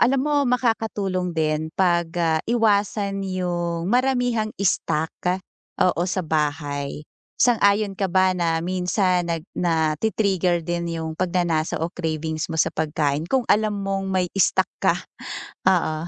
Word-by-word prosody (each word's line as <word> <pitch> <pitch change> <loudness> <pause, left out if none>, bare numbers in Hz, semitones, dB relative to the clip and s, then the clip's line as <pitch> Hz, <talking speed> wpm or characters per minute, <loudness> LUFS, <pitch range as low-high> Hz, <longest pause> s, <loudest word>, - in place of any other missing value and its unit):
alam 260 +3 +4
mo 300 - +1
makakatulong 220 -7 0
din 155 0 0
'pag, 175 -2 +3
ah, 160 -2 +2
iwasan 205 -3 +1
'yung 175 -2 -2
maramihang 245 -4 +1
stock, 160 -4 0 0.7
oo, 175 -1 +2
sa 185 +1 -1
bahay. 145 -1 -2 0.3
Sang-ayon 210 -4 +3
ka 195 - +1
ba, 185 0 +4
na 165 -2 +1
minsan 180 +1 +1
nag 165 -1 -2
na-ti-trigger 175 +2 +1
din 170 0 -2
'yung 160 0 -4
pagnanasa 175 -3 0
o 160 - 0
cravings 160 -2 -3
mo 160 - -3
sa 165 - +2
pagkain 150 -1 0
kung 260 -2 +2
alam 215 0 +3
mong 195 0 -2
may 185 -1 +1
stock 195 - +3
ka? - - +3 0.7
Oo. 165 -3 +1
180 Hz, 130 wpm, -23 LUFS, 160-200 Hz, 0.7 s, alam